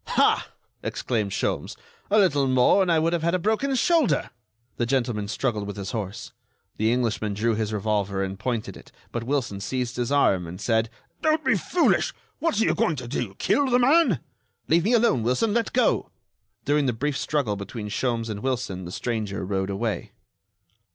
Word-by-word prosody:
"Ha!" - - +3 0.3
exclaimed 110 -5 -2
Sholmes, - - -2 0.3
"a 210 - +3
little 145 -9 +4
more 130 +9 +4
and 185 -2 +2
I 165 - +4
would 165 +2 +1
have 170 - 0
had 170 +2 +1
a - - +3
broken 220 +9 0
shoulder." 285 - +2 0.5
The 120 - 0
gentleman 120 -5 0
struggled 110 -2 -2
with 100 - -6
his 100 -1 -4
horse. 105 -4 -5 0.5
The 110 +1 +2
Englishman 115 -4 0
drew 115 +3 +1
his 110 0 -1
revolver 100 -2 -1
and 95 0 -5
pointed 115 -1 -3
it; - - -14 0.2
but 120 - -3
Wilson 125 -7 -1
seized 125 +3 -3
his 120 +1 -1
arm, 95 -11 +3
and 90 +2 -8
said: 110 -1 +1 0.3
"Don't 310 0 +1
be - - +4
foolish! 355 - +1 0.2
What 330 -10 0
are 225 - +3
you - - +3
going 160 - +1
to 125 -3 -6
do? 120 -6 -3
Kill 285 - +2
the 245 - +4
man?" 300 +7 +4 0.5
"Leave 170 +2 +3
me 230 - +3
alone, 230 - +3
Wilson! 125 - +1
Let 230 -1 0
go!" 250 - +2 0.6
During 145 -1 +2
the 125 - +1
brief 140 +5 -2
struggle 140 -7 0
between 105 +2 -6
Sholmes 115 +1 -1
and 105 -2 -4
Wilson 110 -7 -2
the 85 - -7
stranger 105 -3 -3
rode 95 0 -1
away. 100 -1 -3
120 Hz, 185 wpm, -25 LUFS, 105-165 Hz, 0.6 s, little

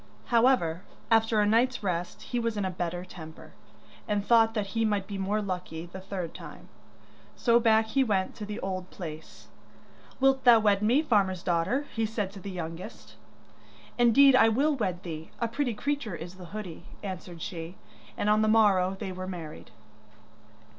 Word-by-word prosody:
However, 230 -9 +3 0.3
after 225 -1 +4
a - - +3
night's 235 +3 +2
rest 180 -2 -3
he 245 - -2
was 230 -2 -2
in 205 - -1
a 190 - -1
better 175 0 -4
temper, 160 -3 -11 0.5
and 205 -1 -1
thought 225 -1 +4
that 210 -2 0
he 225 - +1
might 205 -3 0
be 200 -1 -6
more 205 +2 0
lucky 180 -4 -5
the 175 +2 -9
third 185 -4 -5
time, - - -11 0.7
so 235 -1 +3
back 220 -1 +4
he 270 +4 +3
went 195 -6 0
to - - -6
the 210 +2 -5
old 185 -1 -4
place. 160 -4 -9 0.7
'Wilt 270 0 +3
thou 240 -2 +8
wed 205 -2 +2
me, 245 +8 +3
farmer's 195 - +1
daughter?' 180 +11 0
he 225 -1 0
said 210 -3 -3
to 200 - -10
the 200 - -7
youngest. 175 -1 -7 0.9
'Indeed 255 +3 +6
I 225 -3 +6
will 285 +7 +2
wed 185 -7 -2
thee; 160 -2 -7
a 235 - 0
pretty 245 0 -2
creature 280 -6 -2
is 170 +2 -8
the 185 -1 -11
hoodie,' 180 -3 -8 0.2
answered 180 -3 -7
she, 165 0 -6 0.4
and - - -1
on 210 +1 +4
the 215 - +2
morrow 195 -4 +4
they 195 -4 -4
were 185 0 -6
married. 170 -5 -8
205 Hz, 175 wpm, -28 LUFS, 180-225 Hz, 0.9 s, thou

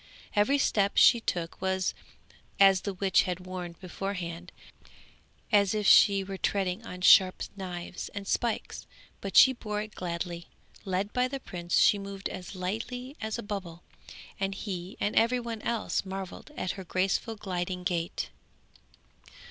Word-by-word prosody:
Every 210 +8 +4
step 200 -7 +1
she 240 - +7
took 175 -7 -3
was, 190 0 0 0.7
as 195 -1 +6
the 200 - -3
witch 190 +1 +3
had 180 0 -3
warned 180 -2 -6
her - - -32
beforehand, 180 -2 -5 1.0
as 205 -1 +4
if 210 -1 -1
she 200 0 +7
were 190 0 -7
treading 195 +1 -1
on 180 -5 -8
sharp 185 0 +6
knives 180 -2 -6
and 200 -1 -5
spikes, 235 0 -2 0.3
but 195 - -2
she 260 - +9
bore 210 -4 -4
it 215 0 -6
gladly; 170 -1 -4 0.4
led 195 +2 -2
by 250 0 +2
the 270 +1 -5
prince, 175 -7 -2
she 205 - +5
moved 195 -1 -5
as 185 +1 -8
lightly 230 +8 -4
as 220 0 -2
a - - -5
bubble, 190 -5 -6 0.6
and 195 0 -1
he 190 -2 -6
and 205 - -1
every 235 +2 +4
one 230 -2 -5
else 235 -1 -1
marvelled 190 +3 -7
at 185 - -1
her 190 - -7
graceful 190 +5 -1
gliding 180 -3 -4
gait. 175 -2 -2
195 Hz, 155 wpm, -29 LUFS, 180-210 Hz, 1.0 s, she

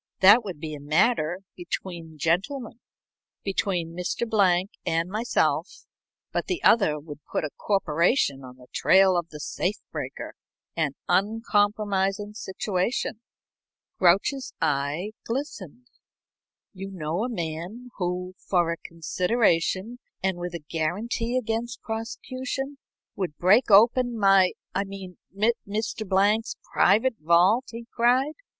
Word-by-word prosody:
That 205 +5 +8
would 185 -7 -6
be 155 0 -5
a 150 - -6
matter 160 +4 +1
between 170 -3 -6
gentlemen, 195 - -1 0.6
between 180 -4 -1
Mr. 180 +6 -2
Blank 190 -3 +2
and 165 +2 0
myself, 225 +4 0 0.5
but - - -2
the 365 -3 -2
other 180 -10 +4
would 145 -1 -10
put - - -1
a 150 - -3
corporation 170 - +1
on 125 0 -11
the 125 - -15
trail 190 -1 +5
of 170 -1 -1
the 150 - -9
safe 180 +6 -2 0.2
breaker - - -6 0.4
an 155 -4 0
uncompromising 205 0 +1
situation." 205 +3 -2 0.8
Grouch's 200 +10 +2
eye 150 +6 0
glistened. 245 - -5 0.9
"You 195 0 -7
know 175 +1 -3
a 250 - -2
man 175 +5 -5
who, 180 0 -2
for 175 -3 +1
a 170 - -3
consideration 185 +5 0 0.2
and 190 -2 0
with 175 0 -4
a 160 -3 -8
guarantee 225 +9 -1
against 235 0 -2
prosecution, 255 +5 -5 0.4
would 180 -7 -3
break 205 +9 +4
open 235 +4 +5
my 195 -3 +5 0.2
I 195 - 0
mean 195 -2 -9 0.5
Mr. 215 0 -3
Blank's 205 +3 +2 0.2
private 225 +5 +3
vault?" 175 - +4
he 230 0 -8
cried. 255 +5 +3
195 Hz, 120 wpm, -26 LUFS, 170-225 Hz, 0.9 s, That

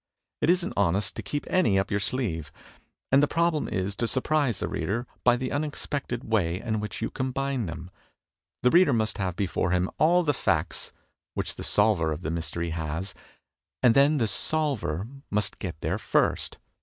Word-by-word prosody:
It - - +2
isn't 180 0 +2
honest 100 0 +2
to - - -4
keep 145 - -4
any 165 - +3
up 95 +1 0
your 100 - +1
sleeve; 95 - -1 0.6
and 135 +1 +6
the 145 - +4
problem 165 0 +1
is 95 +2 -2
to 115 - 0
surprise 135 -1 +1
the - - -1
reader 120 +5 -2 0.2
by 125 -1 +5
the 130 0 -3
unexpected 145 -4 -2
way 90 -6 0
in 110 -1 -2
which 105 -1 -5
you - - -2
combine 130 -3 -2
them. 85 +2 -7 0.7
The 125 - +5
reader 175 -5 +6
must 110 -2 0
have 95 -3 -1
before 95 -2 0
him 90 +1 +1
all 175 +3 +5
the 150 -3 +2
facts - - -1 0.4
which - - -2
the - - -7
solver 105 -7 +3
of 80 +3 -4
the 75 - -2
mystery 85 +1 -2
has, 80 +3 -3 0.7
and 120 -3 +7
then 140 +4 +5
the 115 -5 +2
'Solver' 120 - -1 0.2
must 105 -1 0
get 85 -5 -5
there - - -1
first. - - +1
110 Hz, 180 wpm, -27 LUFS, 90-140 Hz, 0.7 s, and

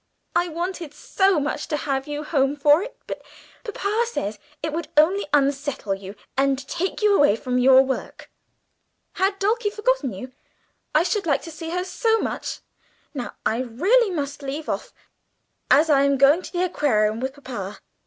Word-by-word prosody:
I 350 +1 +3
wanted 340 -2 -5
so 385 +1 +2
much 290 +1 -3
to 300 - -1
have 270 -2 -2
you 295 0 -4
home 280 -2 +1
for 295 +3 +5
it, 470 - -7
but - - -6 0.4
papa 425 0 -1
says 210 - -4 0.2
it 315 -1 -2
would 335 +1 -3
only 355 +6 +4
unsettle 280 -6 +1
you 195 +1 -8 0.2
and 270 0 +1
take 375 +7 -3
you 415 -1 +5
away 290 - +5
from 250 +2 -1
your 260 +1 +7
work. 265 -1 -5 0.8
"Had 390 +1 0
Dulcie 420 +2 +1
forgotten 425 - 0
you? 230 +7 -8 0.6
I 310 - +5
should 380 +1 -1
like 285 - +1
to 330 - -8
see 325 +1 -7
her 360 +2 -1
so 445 +5 +1
much. - - -4 0.5
Now 255 -5 -5
I 225 - +1
really 365 - +2
must 290 -4 -4
leave 285 +3 -5
off, - - -3 0.8
as 305 +4 +5
I 285 -3 +4
am 280 0 +3
going 280 +6 +5
to - - -10
the 355 0 0
Aquarium 220 -11 +1
with 265 +1 -3
papa. 210 -8 -7
295 Hz, 175 wpm, -23 LUFS, 270-370 Hz, 0.8 s, your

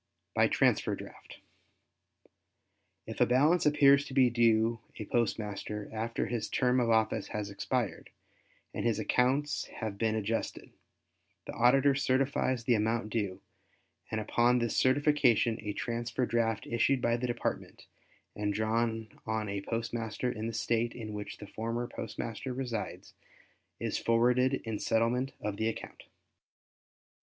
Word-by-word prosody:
By - - +4
Transfer - - +2
Draft.—If - - -15
a - - +7
balance 150 +7 +4
appears 140 -1 +6
to 130 - -8
be 130 -3 +5
due 115 -1 +3 0.2
a 110 - -5
postmaster 105 -2 -2
after 115 +1 -2
his 115 -2 -3
term 125 0 +2
of 120 -2 +1
office 110 -1 +2
has 105 -1 -4
expired 100 - -2 0.6
and - - -3
his 115 -3 +1
accounts 130 +6 +1
have 105 -4 -6
been 110 -1 +1
adjusted, 110 +1 -3 0.7
the - - -6
Auditor 135 +4 +4
certifies 130 -2 +1
the 120 - +3
amount 110 0 0
due 100 -5 -2 0.7
and 110 - -2
upon 120 +3 +2
this 120 -1 -1
certification 130 -4 +3
a 105 -1 -3
transfer 120 +3 -2
draft 115 -2 0
issued 120 +3 +2
by 120 -1 +1
the 125 +1 -2
Department 120 0 -4 0.5
and 105 -1 -1
drawn 110 0 0 0.2
on 110 -1 -1
a 100 0 -3
postmaster 115 +2 -3
in 110 -2 -4
the - - -2
State 115 +1 0
in 110 -3 -6
which 105 0 -6
the 105 - -9
former 115 +3 -3
postmaster 115 +2 -5
resides, 125 -4 -5 0.7
is - - -2
forwarded 125 +3 +2
in 110 -2 -4
settlement 120 +4 +1
of 105 -1 -3
the 110 - 0
account. 115 - -6
115 Hz, 135 wpm, -31 LUFS, 110-125 Hz, 0.7 s, a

